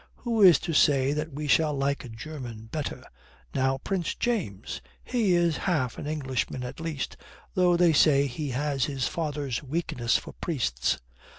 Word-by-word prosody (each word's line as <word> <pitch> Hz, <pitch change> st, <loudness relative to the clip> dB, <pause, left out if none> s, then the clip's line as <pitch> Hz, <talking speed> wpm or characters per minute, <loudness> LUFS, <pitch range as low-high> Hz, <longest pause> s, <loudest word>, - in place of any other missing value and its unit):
Who 230 Hz, -3 st, -1 dB
is 180 Hz, -6 st, +9 dB
to 165 Hz, -, -3 dB
say 140 Hz, -2 st, +4 dB
that 150 Hz, +1 st, -3 dB
we 150 Hz, +2 st, -5 dB
shall 150 Hz, +1 st, +3 dB
like 140 Hz, +1 st, 0 dB
a 125 Hz, -, -9 dB
German 115 Hz, -2 st, -7 dB
better? 155 Hz, -3 st, -4 dB, 0.5 s
Now 135 Hz, 0 st, +1 dB
Prince 180 Hz, +4 st, -2 dB
James 170 Hz, -, -2 dB, 0.2 s
he 220 Hz, -8 st, +2 dB
is 170 Hz, -2 st, +2 dB
half 130 Hz, -9 st, 0 dB
an -, -, -5 dB
Englishman 130 Hz, -4 st, -2 dB
at 125 Hz, -, -7 dB
least, 160 Hz, -4 st, -4 dB, 0.4 s
though 180 Hz, -1 st, +4 dB
they 170 Hz, -2 st, +5 dB
say 140 Hz, -2 st, +5 dB
he 140 Hz, +2 st, -4 dB
has 135 Hz, 0 st, 0 dB
his 135 Hz, -3 st, -1 dB
father's 145 Hz, -6 st, -2 dB
weakness 145 Hz, -4 st, 0 dB
for -, -, -9 dB
priests. 90 Hz, -, -1 dB
145 Hz, 165 wpm, -27 LUFS, 130-165 Hz, 0.5 s, is